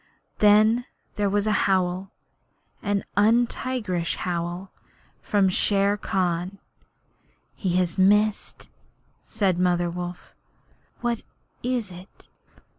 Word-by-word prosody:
Then 215 +3 +5 0.3
there 205 -1 +1
was 205 +1 0
a 215 - +1 0.2
howl 185 0 0 0.7
an 205 -2 -1
untigerish 215 -4 +1
howl 175 +1 -4 0.5
from 200 -2 +2
Shere 200 +2 +2
Khan. 185 -1 -2 1.0
He 180 -3 -1
has 180 -1 0
missed,' 210 +2 +2 0.5
said 190 -4 0
Mother 175 -1 +1
Wolf. 175 0 -7 0.7
'What 235 -2 -1 0.4
is 240 -5 -2
it?' 180 +2 -14
195 Hz, 95 wpm, -25 LUFS, 180-210 Hz, 1.0 s, Then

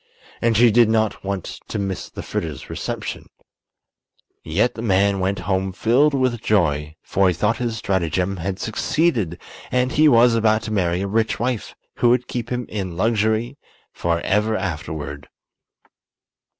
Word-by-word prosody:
And 115 -2 +2
she 120 0 +6
did 115 0 +5
not 110 -1 0
want 100 -2 -4
to - - -4
miss 95 -2 -3
the - - -8
Fritters' 75 -5 -5
reception. - - -5 1.1
Yet 95 +10 +1
the 115 - -7
man 100 -2 +2
went 95 +2 0
home 95 0 0
filled 130 +9 +3
with 130 -4 0
joy; 75 -8 +1
for 95 0 +2
he 90 - +2
thought 105 +6 +1
his 120 -2 -2
stratagem 95 -1 -1
had 95 +2 -3
succeeded 110 - 0 0.3
and 125 0 +1
he 155 +1 +5
was 120 -2 +6
about 110 -1 +2
to 110 - -4
marry 90 -3 +1
a 100 - -1
rich 110 +2 0
wife 120 -2 -2 0.2
who 120 - +3
would 125 +1 +2
keep 120 -1 -4
him 125 -1 -2
in 95 -5 -5
luxury 110 +5 0 0.3
forever 105 +6 0
afterward. 75 -5 -5
105 Hz, 150 wpm, -21 LUFS, 95-115 Hz, 1.1 s, she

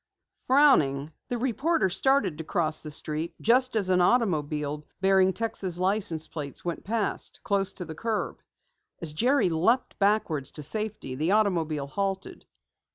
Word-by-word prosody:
Frowning, 160 - +4
the 245 - -2
reporter 265 - +1
started 195 - +2
to - - -3
cross 160 -1 -1
the 155 - -8
street 155 +2 -4
just 250 +2 +3
as 205 -4 +1
an 180 -1 +4
automobile 150 - +1 0.2
bearing 190 0 +4
Texas 190 -4 -3
license 185 -4 0
plates 145 -1 -7
went 175 - -3
past, 220 -1 -2
close 195 -1 0
to 180 - -5
the 160 - -7
curb. 220 +6 -3 0.6
As 160 -3 -1
Jerry 245 - +2
leaped 225 +11 +1
backwards 195 -9 +1
to 150 - -8
safety, 210 -5 -3
the 155 +8 0
automobile 165 -9 +1
halted. 195 +5 -4
185 Hz, 145 wpm, -27 LUFS, 155-220 Hz, 0.6 s, Frowning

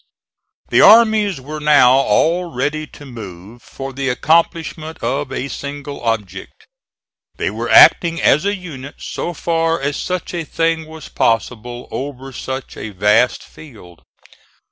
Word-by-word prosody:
The - - +4
armies 215 -5 +5
were 150 +4 -7
now 150 -4 +5
all 140 +7 +2
ready 150 +4 -2
to 145 - -14
move 110 -2 -11
for 135 +3 -8
the 135 0 -2
accomplishment 160 +3 0
of 140 0 -2
a 130 +1 -3
single 145 0 -7
object. 115 - -4 0.7
They - - -2
were - - -4
acting 165 -1 +6
as 150 - +3
a 200 +1 0
unit 145 -7 -9
so 175 - -5
far 165 +1 0
as 140 +1 -2
such 180 -1 -4
a 170 -2 -3
thing 165 0 -1
was 160 0 -11
possible 120 +2 -2
over 135 -1 -6
such 130 +2 -6
a - - -6
vast 105 +5 +2
field. 105 - -15
140 Hz, 140 wpm, -18 LUFS, 125-165 Hz, 0.7 s, acting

